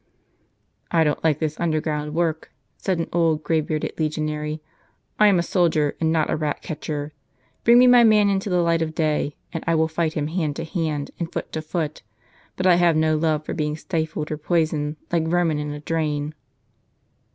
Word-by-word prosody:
"I 165 -1 +3
don't 150 -1 -1
like 155 -3 +3
this 155 -1 -3
underground 155 -2 -1
work," 165 -2 -1 0.2
said 190 -3 -1
an 165 - -2
old, 165 -3 +2
grey 160 +1 +1
bearded 155 0 -3
legionary. 155 0 -2 0.6
"I 210 - +7
am 200 -3 +5
a 170 - +1
soldier, 165 -5 +1
and 160 -1 +2
not 160 -2 +1
a - - +2
rat 150 -1 -3
catcher. 150 -1 -5 0.5
Biing 235 +1 +6
me 250 - +7
my 245 -1 +7
man 215 -2 +5
into 195 0 0
the 180 -1 +2
light 165 -1 +2
of 155 -1 -2
day, 150 -2 0 0.2
and 165 - -4
I 165 - +3
will 160 0 +3
fight 160 0 -1
him 150 -2 -1
hand 155 -2 -2
to 165 - -4
hand, 160 -4 -3
and 170 -1 -3
foot - - -5
to 155 - -3
foot; 155 -1 -3 0.5
but 185 - -3
I 180 -2 +6
have 175 -2 +4
no 155 0 +2
love 155 -1 0
for - - -4
being 150 -2 -1
stifled 160 -2 -3
or 155 - -2
poisoned, 155 -2 0 0.2
like 165 -2 +1
vermin 165 -3 +1
in 150 0 -3
a 150 - -6
drain." 150 -2 -2
160 Hz, 195 wpm, -23 LUFS, 150-170 Hz, 0.6 s, I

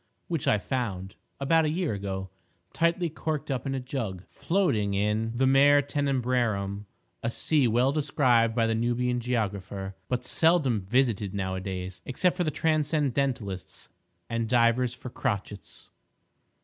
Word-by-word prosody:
which 165 -6 -2
I 110 - +4
found, 100 -5 -3 0.3
about 160 +4 +3
a 155 - +1
year 165 -3 -1
ago, 95 -1 -4 0.4
tightly 170 +1 +1
corked 155 -2 -3
up 130 -1 -2
in 135 - -1
a - - -1
jug 115 -8 -4
floating 140 - 0
in 105 +3 0
the 130 - +3
Mare 140 +2 +5
Tenebrarum—a 120 -8 -2
sea 140 +2 +2
well 120 +4 +3
described 130 -6 +2
by 115 -2 +3
the 115 - +1
Nubian 120 +2 0
geographer, 100 -5 -3 0.2
but 125 0 -1
seldom 150 - +3
visited 110 -5 +1
now 95 -2 -2
a 95 - -3
days, 95 -1 -5
except 175 +8 +1
for 180 - 0
the 155 - 0
transcendentalists 140 - -1 0.4
and 115 -1 -2
divers 120 +1 +3
for 125 0 -9
crotchets. 100 -2 -4
125 Hz, 140 wpm, -27 LUFS, 105-140 Hz, 0.4 s, Mare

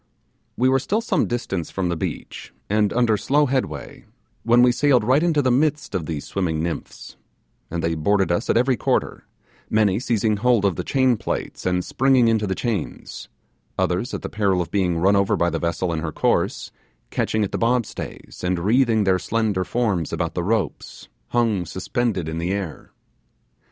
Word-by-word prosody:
We 125 - +3
were 135 0 +3
still 210 - -1
some 230 - 0
distance 95 -8 -3
from 95 -2 -2
the 85 - 0
beach, 80 - -6 0.2
and 105 -1 +2
under 120 -3 +2
slow 145 +7 +2
headway, 125 - -3 0.4
when 120 +1 +4
we 125 - +6
sailed 125 -1 +3
right 130 +6 +3
into 160 -4 +2
the 130 - +2
midst 150 +2 +1
of 85 -6 -2
these 75 -3 -4
swimming 80 -5 -2
nymphs, 85 -1 -6 0.5
and 85 0 -3
they 85 - +1
boarded 95 +3 +1
us 85 - -1
at - - +3
every 125 +2 +3
quarter; - - -1 0.4
many 105 -2 +2
seizing 110 -3 0
hold 120 -1 +2
of 95 -4 +2
the - - -3
chain 130 -3 +2
plates - - -4
and 90 -1 0
springing 130 -2 +3
into 110 -2 +1
the 95 - -1
chains; 110 -9 -4 0.5
others, 95 +9 0
at - - -6
the - - -2
peril 100 -3 +1
of 85 - -3
being 90 -4 +1
run 95 +4 +3
over 100 -1 +2
by 85 0 +1
the 80 - -2
vessel 85 +1 -1
in 80 - -2
her 80 -1 -3
course, - - 0 0.4
catching 110 -1 0
at 100 - -2
the - - -2
bob 120 0 +2
stays, - - -9
and 90 0 0
wreathing 110 +4 +2
their 95 -2 +2
slender 105 -2 0
forms 100 -8 -1
about - - -2
the - - -2
ropes, 100 -3 -3 0.2
hung 115 -6 +1
suspended 95 0 -2
in 80 +1 -3
the 85 +2 -2
air. 95 -5 -5
105 Hz, 185 wpm, -22 LUFS, 90-120 Hz, 0.5 s, we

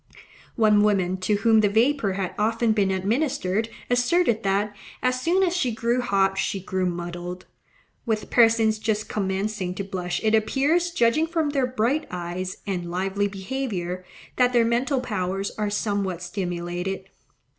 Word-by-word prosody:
One 215 -2 +4
woman 190 -3 +2
to 185 +3 0
whom 220 +2 +4
the 205 - +3
vapour 225 -1 +2
had 190 -1 -3
often 225 +2 +2
been 205 -3 +2
administered 220 +1 0 0.2
asserted 245 0 +2
that, 200 +1 0 0.3
as 255 0 +1
soon 360 +6 +2
as 355 -1 +1
she 260 -9 +1
grew 235 +2 0
hot, 195 -4 +1
she 195 - -1
grew 185 0 -1
MUDDLED. 175 +1 -5 0.6
With 220 -2 -1
persons 225 -2 +4
just 215 -1 -1
commencing 195 -1 -2
to 200 - -3
blush 180 -2 -3
it 220 0 +2
appears, 285 +10 +2
judging 310 +1 +2
from 325 -3 0
their 270 -3 +1
bright 255 +5 0
eyes 180 +1 -5
and 180 -3 -3
lively 190 +3 -1
behaviour, 195 -4 -4 0.3
that 250 0 +3
their 235 -1 +4
mental 250 +3 +1
powers 195 -4 -2
are 210 -1 -2
somewhat 200 -4 -1
stimulated. 180 +1 -4
210 Hz, 150 wpm, -24 LUFS, 190-240 Hz, 0.6 s, One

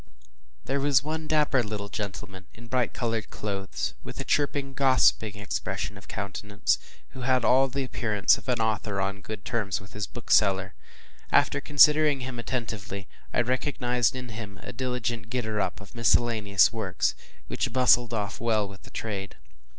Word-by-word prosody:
There 140 +2 0
was 140 -2 +3
one 155 +1 -3
dapper 150 -4 +3
little 105 -2 -4
gentleman 100 -2 -6
in 115 - -12
bright 125 0 0
colored 115 -3 -2
clothes, 100 -2 -3
with - - -8
a - - -1
chirping 140 -1 0
gossiping 130 -6 +3
expression 100 -1 -3
of - - -13
countenance, 100 +1 -1 0.3
who 130 - -10
had 125 -1 +2
all 135 +2 +5
the 135 +1 -2
appearance 110 -5 +2
of - - -10
an 125 -2 +1
author 110 -2 0
on 100 +1 -2
good 105 -1 -7
terms 110 -6 -1
with 100 +2 -14
his 105 0 -3
bookseller. 100 -4 +2 0.6
After - - +3
considering 150 -1 +5
him 125 -1 -5
attentively, 110 -5 -4 0.2
I - - +2
recognized 125 -1 0
in 125 -1 -6
him 110 -4 -8
a 125 - -7
diligent 120 -4 -3
getter 110 -4 -1
up - - -2
of 100 -1 -13
miscellaneous 110 -4 +3
works, 110 -5 0 0.3
which - - -2
bustled 120 -1 +4
off 105 -2 -3
well 110 -3 +1
with 100 0 -12
the - - -14
trade. 100 -3 -5
115 Hz, 160 wpm, -27 LUFS, 100-130 Hz, 0.6 s, all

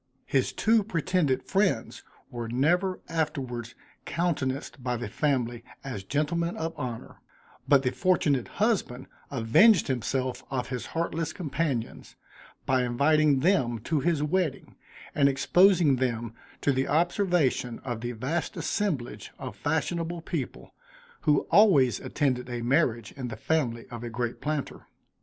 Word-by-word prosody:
His 135 -2 +1
two 220 0 +3
pretended 165 -8 0
friends 195 -1 0 0.3
were 120 -1 -5
never 175 +10 +1
afterwards 130 -7 -3 0.3
countenanced 140 -6 -2
by 125 -1 -1
the 120 - -4
family, 120 -1 -1 0.2
as 115 -8 -5
gentlemen 165 - -1
of 165 0 -3
honor; 120 -3 -6 0.5
but 140 -2 +5
the 125 - +1
fortunate 150 -7 +1
husband 200 - -1 0.2
avenged 140 - +4
himself 130 +1 -2
of 125 -2 -3
his 125 -2 -4
heartless 165 -1 -1
companions, 145 - -3 0.5
by 130 -1 +2
inviting 140 +3 +3
them 135 -9 +2
to 155 +6 0
his 155 +1 +1
wedding, 160 -1 -1 0.4
and 140 -1 +4
exposing 170 +1 +4
them 120 -3 -2 0.3
to 145 - +2
the 130 0 0
observation 165 - +1
of 120 -3 -4
the 120 +1 -3
vast 140 +8 -3
assemblage 165 - -2
of - - -7
fashionable 165 +2 -2
people, - - -5 0.6
who 150 - +5
always 165 - +5
attended 130 -3 -1
a 120 -1 -4
marriage, 120 -4 +1
in 130 -3 -6
the 115 - -6
family 120 -4 -1
of 120 -1 -7
a 120 - -4
great 120 +1 -3
planter. 150 -2 -4
140 Hz, 135 wpm, -27 LUFS, 125-165 Hz, 0.6 s, but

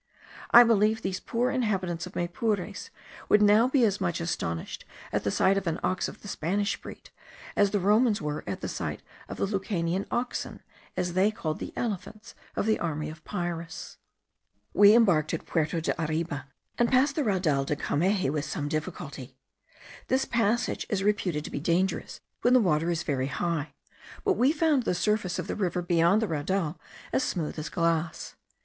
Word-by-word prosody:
I 240 - +10
believe 220 -1 +3
these 190 0 -2
poor 240 +5 -1
inhabitants 190 -9 -1
of - - -13
Maypures 180 +3 -2 0.4
would 210 - +6
now 210 +3 +6
be 260 -2 +3
as 205 -2 0
much 175 -3 0
astonished 85 - -3 0.3
at - - -1
the - - 0
sight 195 +1 +3
of 190 - -8
an 165 0 -1
ox 185 - 0
of - - -11
the - - -8
Spanish 200 +3 -1
breed, - - -11 0.4
as 205 -1 +4
the 205 - 0
Romans 210 +3 +3
were 150 0 -3
at - - -4
the - - -3
sight - - -4 0.3
of - - -6
the - - +1
Lucanian 190 -2 -1
oxen, 245 +1 -3 0.3
as 175 -1 -1
they 190 +3 +4
called 160 -8 -4
the - - -5
elephants 215 +1 -4 0.2
of - - 0
the 220 0 +2
army 155 -2 -2
of 155 0 -13
Pyrrhus. 175 -4 -5 0.8
We 205 +1 +7
embarked 175 -10 +3
at - - -7
Puerto 160 0 0
de 165 - 0
Arriba, 155 -3 -2 0.3
and 240 -1 +3
passed 270 +2 +3
the 300 - +1
Raudal 175 - +1
de 150 - -1
Cameji 185 +2 +1
with 150 0 -2
some 145 0 -3
difficulty. 155 0 -5 0.7
This 265 +1 +2
passage 235 +1 0
is 195 -3 0
reputed 190 -7 0
to - - -7
be - - -3
dangerous 175 +5 -1 0.2
when 245 +1 +4
the - - +7
water 165 -5 +2
is 170 -1 -1
very 135 -3 -1
high; 160 +1 -2 0.5
but 395 - +3
we 265 -4 +3
found 310 -3 +2
the 220 - -1
surface 210 -1 0
of - - -3
the - - -3
river 180 -3 -1
beyond 175 +4 +3
the - - 0
raudal 165 +1 -1 0.3
as - - +3
smooth 165 - -2
as 155 - -4
glass. 165 -1 -1
185 Hz, 180 wpm, -28 LUFS, 165-215 Hz, 0.8 s, I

